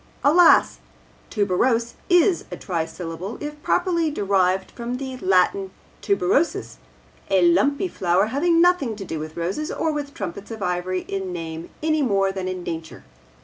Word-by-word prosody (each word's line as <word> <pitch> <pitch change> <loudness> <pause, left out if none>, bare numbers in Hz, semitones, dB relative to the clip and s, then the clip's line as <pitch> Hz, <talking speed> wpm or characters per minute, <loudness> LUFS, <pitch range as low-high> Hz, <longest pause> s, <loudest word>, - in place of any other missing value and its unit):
Alas! 335 +4 +5 0.5
tuberose 230 +3 +1 0.2
is 355 +1 +4
a - - -6
trisyllable 170 +2 -4
if 295 0 -7
properly 340 -2 +1
derived 190 -6 +1
from 240 +1 -5
the 260 -1 -5
Latin 190 -1 +2 0.3
tuberosus, 180 - 0 0.5
the 190 -2 +3
lumpy 280 - +3
flower, 185 - +1
having 335 +4 +3
nothing 340 -10 +3
to 200 -2 -7
do 160 - -4
with 155 +1 -7
roses 190 - -2
or 320 - -1
with 290 -1 -5
trumpets 195 0 -6
of 220 -3 -6
ivory 180 +1 -1
in 190 -1 -4
name 165 -1 -6
any 310 -1 +2
more 195 -7 +2
than 190 -1 -4
in 185 -1 -4
nature. 160 -2 -6
195 Hz, 145 wpm, -23 LUFS, 180-285 Hz, 0.5 s, Alas